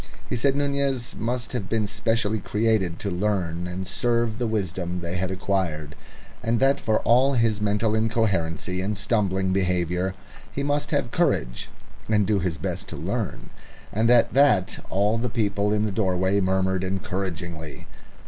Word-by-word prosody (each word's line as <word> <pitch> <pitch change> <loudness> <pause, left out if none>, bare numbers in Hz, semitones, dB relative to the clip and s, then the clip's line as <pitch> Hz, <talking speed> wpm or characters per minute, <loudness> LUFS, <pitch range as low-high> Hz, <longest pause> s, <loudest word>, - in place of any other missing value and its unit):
He - - -2
said 135 +3 +2
Nunez 140 -3 0
must 120 +2 -2
have 105 -7 -3
been 110 -2 +1
specially 110 +2 0
created 105 -4 +1
to 100 - -2
learn 90 -3 -1
and 90 +2 -4
serve 115 +2 0
the 120 - 0
wisdom, 90 -4 -2
they 85 +1 -4
had 90 +1 -1
acquired, 90 -5 -2 0.5
and 115 0 +1
that 135 +1 +3
for 110 -1 +1
all 130 +4 +4
his 115 -4 +2
mental 105 +1 +1
incoherency 100 -6 0
and 100 +2 -2
stumbling 95 -3 +1
behaviour 90 0 0 0.4
he 140 - -3
must 145 +1 0
have - - 0
courage, - - 0 0.4
and 105 -2 +3
do 105 0 +2
his 85 -3 -1
best 75 - -4
to - - -7
learn, - - -4 0.4
and 110 +3 +2
at 120 -1 +5
that 130 -10 +3
all 105 +4 +2
the 125 +1 -1
people 105 -3 0
in 105 0 +2
the 105 - -1
doorway 95 -1 +1
murmured 95 0 +1
encouragingly. 90 -4 -4
100 Hz, 160 wpm, -25 LUFS, 95-115 Hz, 0.5 s, at